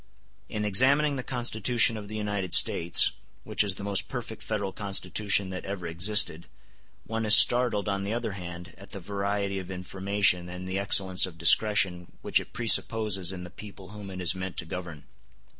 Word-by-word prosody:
In 105 Hz, -1 st, -4 dB
examining 140 Hz, +8 st, +4 dB
the 130 Hz, -, -4 dB
Constitution 120 Hz, -2 st, 0 dB
of 105 Hz, -2 st, -9 dB
the 110 Hz, -, -9 dB
United 105 Hz, -3 st, -1 dB
States, 85 Hz, +1 st, +5 dB, 0.3 s
which -, -, 0 dB
is 100 Hz, -2 st, -4 dB
the 100 Hz, -, -10 dB
most 100 Hz, -1 st, +1 dB
perfect 115 Hz, -4 st, -8 dB
federal 100 Hz, -3 st, -4 dB
constitution 100 Hz, 0 st, -1 dB
that 95 Hz, -1 st, -7 dB
ever 95 Hz, -3 st, -7 dB
existed, 85 Hz, 0 st, 0 dB, 0.6 s
one 115 Hz, 0 st, -4 dB
is 110 Hz, 0 st, +7 dB
startled, 120 Hz, -4 st, +3 dB
on 100 Hz, -1 st, -3 dB
the 100 Hz, -, -5 dB
other 115 Hz, -1 st, -4 dB
hand, 90 Hz, -2 st, -10 dB
at 100 Hz, -, -15 dB
the 100 Hz, -, -6 dB
variety 100 Hz, +1 st, -4 dB
of 95 Hz, -1 st, -10 dB
information 95 Hz, -1 st, -1 dB
and 90 Hz, +1 st, -9 dB
the 95 Hz, +1 st, -3 dB
excellence 95 Hz, -2 st, +2 dB
of 85 Hz, -3 st, -13 dB
discretion 90 Hz, 0 st, +2 dB
which -, -, +2 dB
it -, -, -11 dB
presupposes 110 Hz, -5 st, +3 dB
in 90 Hz, -1 st, -8 dB
the 90 Hz, -, -11 dB
people 100 Hz, -3 st, -13 dB
whom 105 Hz, -1 st, -11 dB
it 95 Hz, -1 st, -9 dB
is 90 Hz, -1 st, +2 dB
meant 95 Hz, 0 st, -7 dB
to -, -, -4 dB
govern. 85 Hz, -3 st, -8 dB
100 Hz, 180 wpm, -26 LUFS, 90-105 Hz, 0.6 s, is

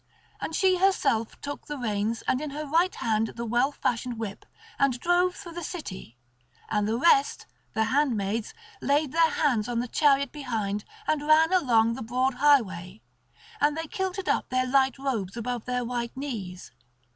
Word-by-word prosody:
And 320 Hz, -, -4 dB
she 370 Hz, -1 st, +3 dB
herself 355 Hz, -, +1 dB
took 285 Hz, 0 st, -6 dB
the 295 Hz, -, -4 dB
reins 220 Hz, -2 st, -2 dB
and 255 Hz, -, +1 dB
in 305 Hz, -, -4 dB
her 300 Hz, +2 st, -5 dB
right 335 Hz, +6 st, +2 dB
hand 220 Hz, -1 st, 0 dB
the 235 Hz, -, -4 dB
well 240 Hz, +5 st, +2 dB
fashioned 245 Hz, -3 st, -2 dB
whip, 215 Hz, -3 st, -6 dB, 0.3 s
and 270 Hz, -3 st, +2 dB
drove 355 Hz, +3 st, +2 dB
through 350 Hz, -4 st, -9 dB
the 345 Hz, +1 st, -6 dB
city; 190 Hz, -, -7 dB, 0.5 s
and 210 Hz, -1 st, +1 dB
the 225 Hz, +2 st, 0 dB
rest, 280 Hz, 0 st, +3 dB, 0.3 s
the 220 Hz, -, +3 dB
handmaids, 225 Hz, -4 st, 0 dB, 0.3 s
laid 285 Hz, 0 st, +1 dB
their 330 Hz, 0 st, +4 dB
hands 245 Hz, -10 st, +1 dB
on 240 Hz, -, -2 dB
the 245 Hz, -, -2 dB
chariot 280 Hz, 0 st, +3 dB
behind 220 Hz, -8 st, -3 dB, 0.2 s
and 300 Hz, -1 st, 0 dB
ran 320 Hz, +3 st, +5 dB
along 230 Hz, -10 st, +3 dB
the 260 Hz, -, -6 dB
broad 255 Hz, +4 st, 0 dB
highway; 220 Hz, -, +2 dB, 0.6 s
and 295 Hz, +1 st, +2 dB
they 325 Hz, -, -3 dB
kilted 375 Hz, +3 st, -3 dB
up -, -, 0 dB
their 255 Hz, 0 st, +1 dB
light 265 Hz, 0 st, +2 dB
robes 235 Hz, -7 st, -3 dB
above 240 Hz, 0 st, -3 dB
their 250 Hz, -1 st, -1 dB
white 240 Hz, +1 st, -4 dB
knees. 205 Hz, -10 st, -6 dB
255 Hz, 170 wpm, -27 LUFS, 225-300 Hz, 0.6 s, ran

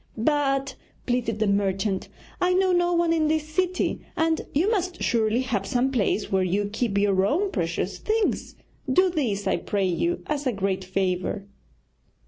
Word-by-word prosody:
'But,' 275 Hz, +2 st, +1 dB, 0.3 s
pleaded 245 Hz, -3 st, 0 dB
the 215 Hz, -, +1 dB
merchant, 195 Hz, -1 st, 0 dB, 0.3 s
'I 360 Hz, 0 st, +3 dB
know 375 Hz, 0 st, +3 dB
no 350 Hz, 0 st, +2 dB
one 340 Hz, -1 st, +2 dB
in 315 Hz, -2 st, +2 dB
this 310 Hz, 0 st, 0 dB
city, 365 Hz, +3 st, -1 dB, 0.2 s
and 320 Hz, 0 st, +2 dB
you 320 Hz, +7 st, +2 dB
must 365 Hz, -4 st, -1 dB
surely 225 Hz, +1 st, +2 dB
have 225 Hz, -7 st, -2 dB
some 255 Hz, +2 st, +1 dB
place 215 Hz, -4 st, 0 dB
where 190 Hz, -1 st, +3 dB
you 190 Hz, +3 st, +1 dB
keep 220 Hz, -3 st, 0 dB
your 200 Hz, -2 st, +3 dB
own 365 Hz, -, +1 dB
precious 175 Hz, +1 st, -2 dB
things. 435 Hz, 0 st, -1 dB, 0.4 s
Do 370 Hz, +6 st, +4 dB
this, 225 Hz, -, -1 dB
I -, -, +2 dB
pray 200 Hz, -2 st, -1 dB
you, 340 Hz, -, 0 dB
as 290 Hz, -2 st, -2 dB
a 250 Hz, -, +1 dB
great 195 Hz, -1 st, -1 dB
favour.' 185 Hz, +1 st, -1 dB
245 Hz, 165 wpm, -25 LUFS, 200-325 Hz, 0.4 s, Do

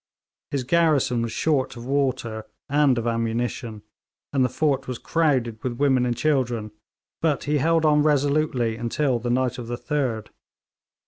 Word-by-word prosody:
His 140 Hz, -3 st, -2 dB
garrison 145 Hz, -5 st, +2 dB
was 115 Hz, -1 st, -2 dB
short 135 Hz, -3 st, 0 dB
of 120 Hz, -, -8 dB
water 130 Hz, -5 st, -1 dB, 0.2 s
and 145 Hz, -2 st, +3 dB
of 115 Hz, -, -2 dB
ammunition, 115 Hz, -1 st, -2 dB, 0.5 s
and 135 Hz, -2 st, +3 dB
the 125 Hz, -, +2 dB
fort 140 Hz, +1 st, 0 dB
was 125 Hz, -2 st, -4 dB
crowded 130 Hz, -10 st, 0 dB
with 125 Hz, -, -1 dB
women 130 Hz, -1 st, +2 dB
and 120 Hz, -1 st, -1 dB
children, 120 Hz, -8 st, 0 dB, 0.5 s
but 155 Hz, -4 st, +1 dB
he 150 Hz, +1 st, +1 dB
held 165 Hz, +2 st, +2 dB
on 150 Hz, -1 st, +4 dB
resolutely 145 Hz, -5 st, +1 dB
until 120 Hz, +2 st, 0 dB
the 120 Hz, +1 st, -3 dB
night 125 Hz, 0 st, 0 dB
of 120 Hz, -, -6 dB
the 120 Hz, 0 st, -3 dB
3d. 130 Hz, -7 st, -2 dB
130 Hz, 155 wpm, -24 LUFS, 120-145 Hz, 0.5 s, on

